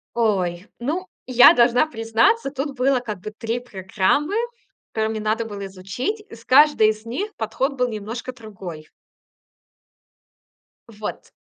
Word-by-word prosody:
Ой, 190 Hz, -5 st, 0 dB
ну, 320 Hz, +10 st, -2 dB, 0.2 s
я 250 Hz, -1 st, +8 dB
должна 245 Hz, +4 st, +4 dB
признаться, 230 Hz, -, +2 dB
тут 280 Hz, 0 st, -4 dB
было 260 Hz, 0 st, +2 dB
как 215 Hz, -6 st, -6 dB
бы 215 Hz, -, -6 dB
3 225 Hz, +2 st, -3 dB
программы, 245 Hz, -, 0 dB, 0.6 s
которые 220 Hz, 0 st, 0 dB
мне 220 Hz, -1 st, -3 dB
надо 215 Hz, +2 st, 0 dB
было 200 Hz, -2 st, -6 dB
изучить. 195 Hz, -, -4 dB
И -, -, -9 dB
с 230 Hz, -, -17 dB
каждой 280 Hz, -5 st, +6 dB
из 215 Hz, +1 st, -6 dB
них 395 Hz, -, -4 dB
подход 260 Hz, +6 st, -1 dB
был 250 Hz, -1 st, 0 dB
немножко 225 Hz, +4 st, -5 dB
другой. 190 Hz, -9 st, -9 dB, 2.0 s
Вот, 215 Hz, -1 st, -7 dB
230 Hz, 135 wpm, -22 LUFS, 215-260 Hz, 2.0 s, я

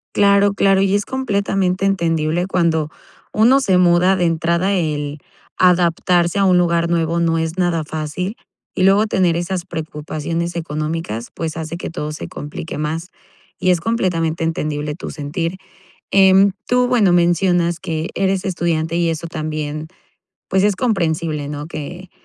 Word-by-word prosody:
Claro, 200 Hz, 0 st, +4 dB
claro. 195 Hz, -1 st, +3 dB
Y 195 Hz, 0 st, +2 dB
es 205 Hz, -, +1 dB
completamente 200 Hz, -7 st, -1 dB
entendible 170 Hz, -2 st, 0 dB
cuando 165 Hz, -4 st, +1 dB, 0.4 s
uno 240 Hz, +6 st, +5 dB
se 190 Hz, -8 st, +2 dB
muda 180 Hz, +1 st, +4 dB
de 180 Hz, -, 0 dB
entrada, 170 Hz, +3 st, +1 dB
el 150 Hz, -4 st, -2 dB, 0.4 s
adaptarse 175 Hz, 0 st, +3 dB
a 195 Hz, -, +3 dB
un 180 Hz, -1 st, +4 dB
lugar 170 Hz, -1 st, +2 dB
nuevo 170 Hz, 0 st, +1 dB
no 165 Hz, -1 st, +1 dB
es 160 Hz, +2 st, -2 dB
nada 175 Hz, -3 st, +1 dB
fácil. 160 Hz, +7 st, -4 dB, 0.4 s
Y 185 Hz, -, 0 dB
luego 200 Hz, +3 st, +4 dB
tener 180 Hz, -4 st, +2 dB
esas 175 Hz, +1 st, -2 dB
preocupaciones 165 Hz, +1 st, -4 dB
económicas, 155 Hz, -7 st, -4 dB
pues, 160 Hz, 0 st, -4 dB
hace 160 Hz, +1 st, -5 dB
que 175 Hz, -, -5 dB
todo 150 Hz, -2 st, -5 dB
se -, -, -7 dB
complique 150 Hz, +2 st, -7 dB
más, 160 Hz, +4 st, -3 dB, 0.5 s
y 185 Hz, -, +3 dB
es 170 Hz, -2 st, +1 dB
completamente 170 Hz, -6 st, 0 dB
entendible 150 Hz, -2 st, -2 dB
tu -, -, -7 dB
sentir. 165 Hz, +4 st, -4 dB, 0.5 s
Em, 195 Hz, 0 st, +6 dB, 0.2 s
tú 250 Hz, 0 st, +3 dB
bueno, 210 Hz, -8 st, +4 dB
mencionas 175 Hz, 0 st, +2 dB
que 165 Hz, -2 st, -3 dB
eres 195 Hz, 0 st, 0 dB
estudiante 170 Hz, -3 st, -1 dB
y 170 Hz, -1 st, +1 dB
eso 165 Hz, +1 st, -3 dB
también, 155 Hz, -1 st, -4 dB, 0.6 s
pues, 190 Hz, +1 st, +2 dB
es 205 Hz, -2 st, +3 dB
comprensible, 165 Hz, -, -1 dB
¿no? 145 Hz, 0 st, -5 dB
Que 175 Hz, +3 st, -7 dB
170 Hz, 150 wpm, -19 LUFS, 160-190 Hz, 0.6 s, Em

